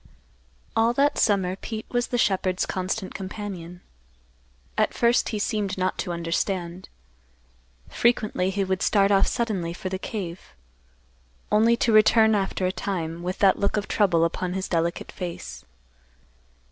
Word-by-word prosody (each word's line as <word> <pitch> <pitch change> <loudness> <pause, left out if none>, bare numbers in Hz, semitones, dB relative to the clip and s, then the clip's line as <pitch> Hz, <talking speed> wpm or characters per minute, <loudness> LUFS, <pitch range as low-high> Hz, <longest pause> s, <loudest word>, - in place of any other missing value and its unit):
All 225 +1 +3
that 285 +3 +2
summer 190 -3 +2
Pete 220 +2 -6
was 245 0 0
the 245 - -1
shepherd's 185 -4 +1
constant 185 +2 -3
companion. 190 -3 -7 0.9
At - - +1
first 235 0 +3
he 220 - -2
seemed 205 -2 -1
not 185 0 -1
to 180 - -2
understand. 170 +1 -3 1.0
Frequently 215 -6 +1
he 195 +1 -1
would 190 -1 -1
start 200 -1 +3
off 195 -1 +4
suddenly 195 -8 -2
for 185 +1 -5
the 190 0 -4
cave, 185 - -6 1.0
only 230 +2 +4
to 230 -1 +2
return 220 +1 +6
after 195 -2 0
a 185 - +1
time, 170 -5 -4
with 180 +1 -3
that 190 - +4
look 200 +1 0
of 205 - -2
trouble 175 -6 +3
upon 180 +2 -2
his 190 0 -3
delicate 170 0 -1
face. 175 - -7
190 Hz, 145 wpm, -25 LUFS, 180-215 Hz, 1.0 s, return